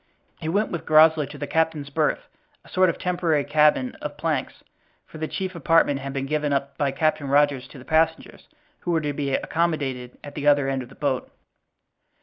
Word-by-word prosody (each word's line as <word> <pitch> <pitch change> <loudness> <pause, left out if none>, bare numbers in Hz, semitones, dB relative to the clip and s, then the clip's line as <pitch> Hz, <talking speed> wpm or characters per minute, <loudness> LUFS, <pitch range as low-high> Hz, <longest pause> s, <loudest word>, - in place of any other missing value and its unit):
He 160 - -4
went 205 +5 0
with 170 - -5
Groslow 155 -1 +6
to 145 +2 -10
the 145 - -4
captain's 155 -2 -1
berth, 155 0 0 0.4
a - - -16
sort 185 -1 +3
of - - -2
temporary 170 -5 0
cabin 150 -4 +3
of - - -6
planks, - - -2 0.4
for 155 - -12
the 155 - -2
chief 185 +2 -4
apartment 165 -3 +2
had 135 0 -5
been 135 0 -3
given 150 0 -1
up 140 0 -1
by 140 0 0
Captain 155 0 0
Rogers 140 -2 +2
to - - -13
the 130 - -12
passengers, 160 0 0 0.3
who - - -6
were 165 -2 +2
to 145 -1 -2
be 140 -1 -1
accommodated 140 -7 -2
at 145 - -9
the 145 -1 -3
other 145 -2 +4
end 135 -1 -1
of 125 - -10
the - - -15
boat. 135 -3 -2
150 Hz, 200 wpm, -24 LUFS, 140-160 Hz, 0.4 s, Groslow